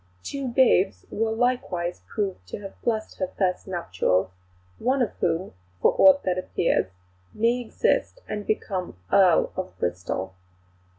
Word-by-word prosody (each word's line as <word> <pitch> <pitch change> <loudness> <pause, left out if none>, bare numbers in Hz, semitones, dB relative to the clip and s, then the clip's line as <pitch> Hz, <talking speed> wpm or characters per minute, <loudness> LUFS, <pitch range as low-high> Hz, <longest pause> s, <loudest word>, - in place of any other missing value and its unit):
Two 275 -1 -4
babes 230 - +3
were 225 +1 0
likewise 220 -7 -1
proved 195 - -3
to - - -5
have 195 -1 -10
blessed 220 -2 -2
her 185 - 0
first 185 -1 0
nuptials, 95 - 0 0.5
one 260 +3 +1
of 245 - +1
whom, 165 - 0 0.3
for - - +4
aught 285 0 +7
that 185 0 0
appears, 170 - +1 0.5
may 235 +3 +2
exist 460 - 0
and 210 -1 -5
become 185 - -2
Earl 185 -4 +5
of 185 0 -5
Bristol." 90 +1 -3
195 Hz, 135 wpm, -25 LUFS, 175-235 Hz, 0.5 s, aught